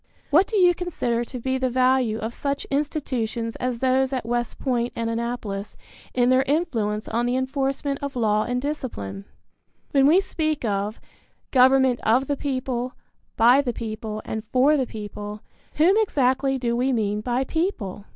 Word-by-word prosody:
What 345 +7 +5
do 440 - -1
you 355 -2 +6
consider 275 -10 -2
to 250 - -7
be 260 +2 -1
the 260 0 +1
value 255 -3 +2
of 225 +1 -4
such 280 +2 -2
institutions 255 -6 -2
as 250 -1 -2
those 260 +1 +2
at 255 -4 -2
West 240 0 -2
Point 245 -3 -1
and 230 0 -2
Annapolis 230 -4 -4 0.4
in 245 0 +3
their 255 0 +5
influence 230 -9 0
on 235 +2 0
the 245 - 0
enforcement 275 +1 -1
of 280 -1 -4
law 215 -3 +2
and 245 0 -1
discipline? 250 - -5 0.7
When 275 -1 +5
we 335 +6 +6
speak 310 -7 -2
of 205 +1 -2 0.5
"Government 260 -1 +5
of 245 +5 +2
the 285 - -1
people, 255 -2 -3 0.4
by 245 +5 +6
the 250 -4 -2
people, 215 -1 -5
and 220 -1 -4
for 270 +4 +4
the 265 -4 0
people," 210 -1 -7 0.3
whom 340 +6 +4
exactly 270 - +1
do 240 -2 -1
we 255 +3 +1
mean 210 -3 0
by 245 +3 0
"people"? 265 - -3
255 Hz, 165 wpm, -24 LUFS, 230-275 Hz, 0.7 s, you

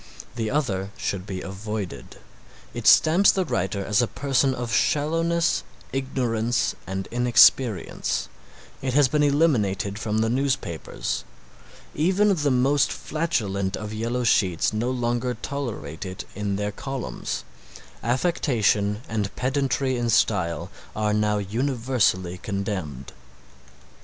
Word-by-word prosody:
The 115 -2 -2
other 105 -9 -1
should 95 0 -3
be 95 -2 -4
avoided. 95 - -6 0.6
It - - -3
stamps 175 +5 +6
the 190 -1 0
writer 100 - -1
as 105 +3 +3
a 120 - +1
person 135 0 +1
of 120 -3 -4
shallowness, 165 +6 +2 0.3
ignorance 120 -3 0
and 95 0 -4
inexperience. 120 -2 +3 0.5
It 130 -1 -2
has 145 -2 +6
been 150 +3 +1
eliminated 115 - +2
from 110 -1 -1
the 110 0 +2
newspapers. 105 - -2 0.7
Even 190 +6 +3
the 150 -5 +1
most 135 +2 +3
flatulent 100 - -2
of 105 0 -6
yellow 115 +3 -2
sheets 95 -5 +2
no 115 +3 0
longer 120 0 -1
tolerate 110 - -5
it 95 -1 -6
in 100 0 -2
their 105 +1 -2
columns. 130 - -4 0.6
Affectation 115 - +1
and 105 -2 -2
pedantry 135 0 0
in 120 -1 -1
style 90 -7 +1 0.2
are 105 -1 0
now 105 0 +2
universally 110 -4 0
condemned. 95 - -4
115 Hz, 115 wpm, -24 LUFS, 100-135 Hz, 0.7 s, stamps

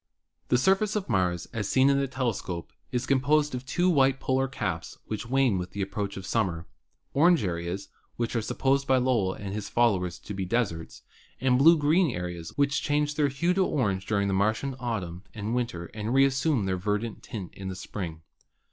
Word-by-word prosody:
The - - +3
surface 195 - +2
of 205 -3 -1
Mars, 90 -6 +1
as 105 -4 -2
seen 130 +1 +4
in 140 0 +4
the 140 - 0
telescope, 115 -10 -3 0.2
is 125 0 -1
com 135 0 +3
posed 150 +1 +2
of 125 +1 -5
two 175 +6 +1
white 135 -6 +4
polar 130 +1 +1
caps, 130 - -4
which 110 +1 -5
wane 130 -6 +2
with 90 - -6
the 100 - -3
ap 95 - -5
proach 100 -1 -3
of 95 - -7
summer; 90 -8 -1 0.5
orange 170 +1 +4
areas, 85 +1 -3 0.3
which 120 0 -2
are 115 - +2
supposed 135 +5 0
by 130 - +4
Lowell 120 -7 +2
and 100 -2 -6
his 105 -1 -4
followers 95 -8 +2
to 105 - -8
be 95 -1 -3
deserts, 95 -5 -2 0.4
and 130 -1 +3
blue 165 +4 +7
green 155 +4 +3
areas, 90 -2 -5
which 140 0 +2
change 150 0 +1
their 150 -1 +2
hue 165 +6 +1
to 190 +1 +3
orange 100 - 0
during 100 -2 +1
the 100 - 0
Mar 100 +3 +3
tian 135 +2 -4
autumn 95 -8 -3
and 110 +1 -3
winter 120 -9 -2
and 110 +3 -2
reassume 135 -3 +3
their 95 -1 0
verdant 105 +4 -2
tint 100 -6 -7
in 95 -1 -6
spring. 85 -5 -6
115 Hz, 200 wpm, -27 LUFS, 95-135 Hz, 0.5 s, blue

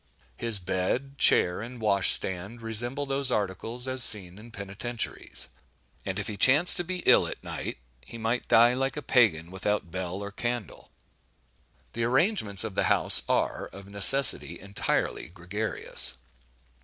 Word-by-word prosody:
His 115 -3 -1
bed, 100 +10 -4
chair, 90 +2 +3
and 120 +2 -10
wash 100 -3 +3
stand, 100 +6 0
resemble 120 +6 +2
those 135 -1 +2
articles 110 +5 -4
as 130 -1 +3
seen 95 -4 +3
in 115 +2 -15
penitentiaries; 105 +3 -5 0.6
and 95 -1 -6
if 100 - -5
he 105 - -7
chance 140 - +4
to 175 - -2
be 180 +1 -6
ill - - +4
at - - -9
night, - - -7 0.3
he 115 - -12
might 115 +2 -4
die 120 +2 +4
like 135 +3 -4
a 150 - -6
Pagan, 95 -10 +1
"without 95 -1 -4
bell 90 0 -6
or 100 - -8
candle." 120 -1 -6 1.0
The 115 0 -3
arrangements 125 - 0
of 110 -3 -7
the - - -1
house - - +4
are, - - -2
of 100 0 -14
necessity, 100 +7 +5
entirely 100 -5 -4
gregarious. 95 +5 -2
110 Hz, 150 wpm, -25 LUFS, 95-125 Hz, 1.0 s, necessity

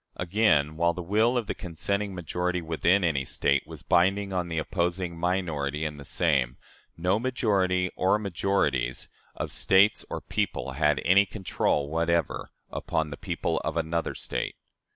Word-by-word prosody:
Again, 85 -6 +2
while 85 +1 +3
the 90 - -5
will 110 +7 +2
of 120 - -1
the - - -2
consenting 100 +3 -2
majority 90 +1 -2
within 85 +4 +2
any 75 -6 +1
State 70 0 0
was - - -9
binding 95 +3 +2
on 90 -1 -1
the 80 -1 -4
opposing 85 +1 -1
minority 80 -4 -1
in 75 -1 -4
the 70 - -9
same, 65 -6 +1 0.4
no 90 +5 +1
majority, 95 -7 +1
or 95 +3 +3
majorities, 95 - 0 0.3
of - - -4
States 100 +2 +4
or - - -3
people 65 - -2
had 75 +2 +2
any 100 +3 +5
control 90 -7 -1
whatever 85 0 0 0.2
upon 80 -1 -2
the - - -4
people - - -2
of - - -3
another 85 +1 -1
State. - - -3
90 Hz, 150 wpm, -27 LUFS, 80-95 Hz, 0.4 s, any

